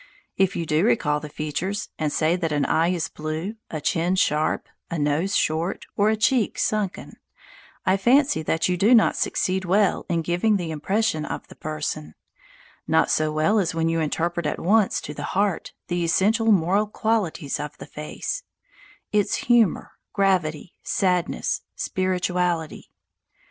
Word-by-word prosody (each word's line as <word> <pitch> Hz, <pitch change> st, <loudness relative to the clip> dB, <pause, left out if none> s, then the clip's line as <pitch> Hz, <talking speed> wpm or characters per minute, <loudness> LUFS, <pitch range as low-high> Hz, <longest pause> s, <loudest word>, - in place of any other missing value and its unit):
If 190 Hz, 0 st, +2 dB
you 170 Hz, -, -2 dB
do 155 Hz, +2 st, +1 dB
recall 150 Hz, -10 st, +2 dB
the 150 Hz, -, -8 dB
features, 155 Hz, +7 st, -3 dB
and 155 Hz, -2 st, 0 dB
say 160 Hz, +3 st, +2 dB
that 165 Hz, -3 st, -2 dB
an 145 Hz, -1 st, +1 dB
eye 165 Hz, +1 st, +2 dB
is 175 Hz, -2 st, 0 dB
blue, 155 Hz, +8 st, -5 dB
a 155 Hz, -, -4 dB
chin 170 Hz, +4 st, 0 dB
sharp, 155 Hz, -4 st, +1 dB, 0.2 s
a 170 Hz, -, -3 dB
nose 155 Hz, +7 st, 0 dB
short, 160 Hz, +4 st, 0 dB
or 205 Hz, +1 st, +3 dB
a 220 Hz, -, +2 dB
cheek 225 Hz, +1 st, +1 dB
sunken, 210 Hz, -3 st, -2 dB, 0.7 s
I 190 Hz, +1 st, +3 dB
fancy 260 Hz, -, +3 dB
that 160 Hz, +1 st, 0 dB
you 180 Hz, -1 st, 0 dB
do 215 Hz, +7 st, +5 dB
not 225 Hz, -, +4 dB
succeed 190 Hz, +1 st, 0 dB
well 195 Hz, +2 st, +1 dB
in 170 Hz, -2 st, 0 dB
giving 175 Hz, +6 st, +2 dB
the 170 Hz, -3 st, -4 dB
impression 160 Hz, +2 st, 0 dB
of -, -, -5 dB
the -, -, -13 dB
person, 150 Hz, -, -4 dB, 0.7 s
not -, -, +3 dB
so 155 Hz, 0 st, +1 dB
well 155 Hz, +8 st, +2 dB
as 170 Hz, -4 st, -1 dB
when 165 Hz, 0 st, +1 dB
you 165 Hz, 0 st, 0 dB
interpret 165 Hz, +1 st, -1 dB
at -, -, -2 dB
once 205 Hz, +3 st, +2 dB
to 150 Hz, -, -7 dB
the 145 Hz, -, -7 dB, 0.2 s
heart 200 Hz, -3 st, 0 dB, 0.2 s
the 175 Hz, -1 st, -1 dB
essential 220 Hz, +7 st, +3 dB
moral 195 Hz, +3 st, +3 dB
qualities 205 Hz, -9 st, -1 dB
of 150 Hz, 0 st, -6 dB
the -, -, -9 dB
face 150 Hz, -, -5 dB, 0.7 s
its 210 Hz, -1 st, +2 dB
humour, 235 Hz, -7 st, +2 dB, 0.2 s
gravity, 180 Hz, -5 st, 0 dB
sadness, 180 Hz, -2 st, 0 dB
spirituality. 180 Hz, -3 st, -1 dB
175 Hz, 160 wpm, -24 LUFS, 155-200 Hz, 0.7 s, do